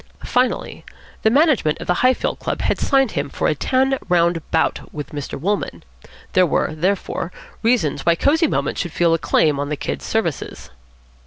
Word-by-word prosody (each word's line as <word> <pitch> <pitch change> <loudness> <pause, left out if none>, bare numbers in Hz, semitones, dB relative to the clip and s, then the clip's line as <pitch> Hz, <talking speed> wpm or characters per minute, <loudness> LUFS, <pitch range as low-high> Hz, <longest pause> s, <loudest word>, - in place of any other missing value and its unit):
Finally, 250 -1 -1 0.4
the 220 - +4
management 270 - +3
of - - -6
the 180 - +2
Highfield 255 0 +1
Club - - -3
had - - 0
signed 270 -3 +2
him - - -2
for - - -1
a - - +2
ten 265 +1 +1
round 170 -1 +2
bout 160 - 0
with 150 -2 -7
Mr. 145 -2 -5
Wolmann. 200 +7 -2 0.5
There 185 -1 +4
were, 155 - 0
therefore, 180 +1 -1 0.3
reasons 215 - +1
why 170 - +4
Cosy 310 - +3
Moments - - -1
should 175 -4 -5
feel 170 -1 +3
a 165 - +1
claim 150 -2 +2
on 145 0 -2
the 150 - -2
Kid's - - -4
services. 170 - -3
180 Hz, 175 wpm, -20 LUFS, 160-250 Hz, 0.5 s, the